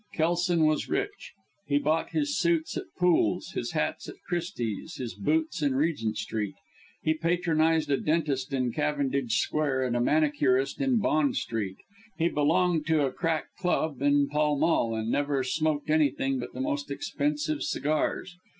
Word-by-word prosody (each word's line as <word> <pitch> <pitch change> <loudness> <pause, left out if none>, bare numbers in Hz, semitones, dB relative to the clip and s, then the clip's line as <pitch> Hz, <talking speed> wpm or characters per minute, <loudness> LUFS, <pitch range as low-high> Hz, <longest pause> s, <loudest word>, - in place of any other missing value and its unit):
Kelson 170 0 +2
was 155 0 +1
rich. 415 +5 -3 0.3
He 145 - +2
bought 155 +3 +1
his 295 -2 -1
suits 170 -2 +1
at - - -3
Poole's, 180 -2 +2
his - - -4
hats - - -2
at - - -9
Christie's, 170 - -3
his 120 -6 -5
boots 155 - 0
in 140 -3 +1
Regent 135 -7 0
Street. 105 -3 -3 0.5
He 155 - +3
patronized 160 -2 +1
a 140 - +3
dentist 150 -3 0
in 130 -3 0
Cavendish 140 -3 0
Square, 145 -4 0
and 125 -2 -1
a 120 - +1
manicurist 145 -2 +2
in 265 -3 +2
Bond 155 - +2
Street. 105 -5 -3 0.4
He 170 +1 +2
belonged 160 +2 +2
to 155 -3 +3
a 135 - -1
crack 165 -2 -2
club 160 -6 0
in 145 0 +3
Pall 150 0 +1
Mall, 140 -7 +2
and 110 +1 -2
never 140 -2 +1
smoked 155 +2 0
anything 135 -3 +2
but 120 - -6
the - - -3
most 290 0 -2
expensive 295 +1 -2
cigars. 155 - -1
155 Hz, 160 wpm, -28 LUFS, 135-170 Hz, 0.5 s, He